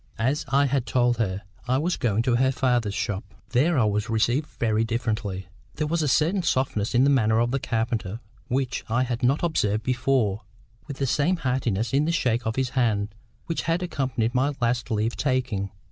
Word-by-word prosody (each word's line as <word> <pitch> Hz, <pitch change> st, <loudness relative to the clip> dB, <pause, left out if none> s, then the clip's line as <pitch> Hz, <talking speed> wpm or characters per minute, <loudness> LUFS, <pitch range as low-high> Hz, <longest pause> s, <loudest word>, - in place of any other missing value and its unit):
As 130 Hz, +6 st, 0 dB
I 140 Hz, +1 st, +4 dB
had 135 Hz, -2 st, 0 dB
told 120 Hz, -1 st, +2 dB
her, 100 Hz, -4 st, -1 dB, 0.2 s
I 130 Hz, +1 st, +2 dB
was 170 Hz, +6 st, 0 dB
going 115 Hz, -1 st, 0 dB
to 120 Hz, -1 st, +2 dB
her 130 Hz, +1 st, +3 dB
father's 120 Hz, -6 st, 0 dB
shop. 105 Hz, 0 st, -2 dB, 0.3 s
There 150 Hz, +6 st, +2 dB
I 125 Hz, -, +4 dB
was 105 Hz, +1 st, 0 dB
received 120 Hz, +6 st, +1 dB
very 110 Hz, -1 st, +1 dB
differently. 110 Hz, -5 st, -2 dB, 0.3 s
There 155 Hz, -, -1 dB
was 165 Hz, +2 st, 0 dB
a 150 Hz, -, +1 dB
certain 165 Hz, +8 st, +2 dB
softness 125 Hz, -, 0 dB
in 125 Hz, -, +5 dB
the 140 Hz, -, +4 dB
manner 110 Hz, -4 st, +3 dB
of 120 Hz, +1 st, +1 dB
the 135 Hz, -, 0 dB
carpenter 115 Hz, -4 st, -2 dB, 0.3 s
which 130 Hz, 0 st, -1 dB
I 120 Hz, +3 st, +2 dB
had 120 Hz, -1 st, -3 dB
not 135 Hz, +6 st, +2 dB
observed 110 Hz, -10 st, +1 dB
before, 125 Hz, -4 st, +1 dB, 0.5 s
with 140 Hz, -3 st, -6 dB
the 135 Hz, -, 0 dB
same 150 Hz, +7 st, +2 dB
heartiness 120 Hz, -, -1 dB
in 145 Hz, +2 st, +3 dB
the 165 Hz, -, +1 dB
shake 120 Hz, -8 st, 0 dB
of 110 Hz, -, -1 dB
his 130 Hz, -1 st, 0 dB
hand 110 Hz, -6 st, 0 dB, 0.3 s
which 165 Hz, -, -2 dB
had 170 Hz, +2 st, +1 dB
accompanied 130 Hz, -8 st, -1 dB
my 140 Hz, +3 st, +1 dB
last 120 Hz, 0 st, 0 dB
leave 110 Hz, +1 st, 0 dB
taking. 125 Hz, -8 st, -1 dB
125 Hz, 195 wpm, -25 LUFS, 110-135 Hz, 0.5 s, in